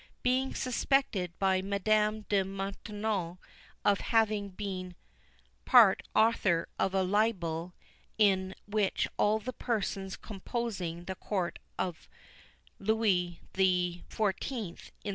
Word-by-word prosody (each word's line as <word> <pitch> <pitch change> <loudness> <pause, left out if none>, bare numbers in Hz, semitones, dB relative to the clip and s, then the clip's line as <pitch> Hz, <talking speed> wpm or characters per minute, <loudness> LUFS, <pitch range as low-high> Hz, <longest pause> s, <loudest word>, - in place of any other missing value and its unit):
Being 255 +1 +1
suspected 250 -8 0
by 190 -1 +2
Madame 210 +2 +1
de 200 -2 +3
Maintenon 195 -1 -3 0.5
of 200 -1 +4
having 215 -3 +1
been 185 -2 -5 0.7
part - - +7
author 210 -7 +3
of 195 0 +1
a 190 - +3
libel 185 -4 0 0.4
in 190 -3 +3
which 205 -2 +1
all 210 +1 +3
the 220 +4 -5
persons 195 -6 -2
composing 195 -5 -4
the 190 - -3
Court 185 -2 -3 0.2
of 180 -3 -4 0.7
Louis 195 -5 +1
XIV. 190 +3 -1
195 Hz, 100 wpm, -31 LUFS, 185-215 Hz, 0.7 s, part